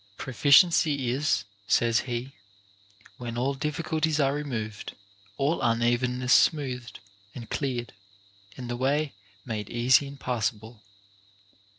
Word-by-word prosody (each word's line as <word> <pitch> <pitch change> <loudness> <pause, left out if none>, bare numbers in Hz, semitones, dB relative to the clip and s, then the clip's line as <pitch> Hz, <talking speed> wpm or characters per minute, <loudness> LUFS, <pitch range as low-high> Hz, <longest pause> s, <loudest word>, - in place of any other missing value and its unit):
Proficiency 140 0 +4
is 130 -7 +1 0.2
(says 115 -1 +3
he) 125 +1 -4 0.9
when 120 -1 -6
all 130 +3 0
difficulties 155 +2 -1
are 135 -1 +2
removed, 120 -8 -5 0.4
all 145 +4 0
unevenness 125 +1 +1
smoothed 125 -6 +1 0.4
and 115 -3 -9
cleared, 125 -4 -3 0.6
and 125 -2 -6
the 120 0 -3
way 140 +3 0 0.3
made 105 -4 -4
easy 125 +4 +3
and 140 0 -11
passa 120 -2 -1
ble. 110 +1 -14
125 Hz, 110 wpm, -27 LUFS, 120-140 Hz, 0.9 s, Proficiency